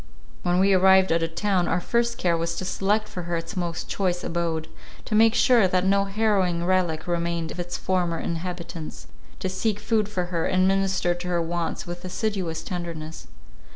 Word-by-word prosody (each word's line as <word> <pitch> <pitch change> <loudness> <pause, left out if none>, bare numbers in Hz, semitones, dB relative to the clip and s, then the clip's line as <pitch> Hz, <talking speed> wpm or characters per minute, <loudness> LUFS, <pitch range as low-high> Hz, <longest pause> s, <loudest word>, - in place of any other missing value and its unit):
When 175 0 +1
we 195 +1 +4
arrived 190 0 +5
at 165 0 +2
a 165 - +1
town, 180 +2 0
our - - +1
first 235 +5 0
care 175 -2 +1
was 165 0 -2
to 185 - -4
select 210 +3 0
for 180 - -6
her 170 - 0
its 165 0 -6
most 170 -3 -3
choice 180 -3 -1
abode; 165 -2 -2 0.4
to - - -4
make 225 +2 +5
sure 235 -6 +5
that 185 0 +1
no 195 +1 +3
harrowing 195 -4 +1
relic 180 -4 +1
remained 170 -1 -1
of - - -8
its 175 0 -3
former 180 -3 0
inhabitants; 170 -1 -5 0.3
to - - -3
seek 200 +3 -1
food 215 -1 0
for 185 -4 -2
her, 165 -1 +1
and 185 0 +3
minister 195 -2 +1
to 175 +1 -7
her 175 -1 +1
wants 170 0 -2
with 175 0 -7
assiduous 185 -4 -2
tenderness. 165 -3 -6
180 Hz, 190 wpm, -25 LUFS, 170-195 Hz, 0.4 s, arrived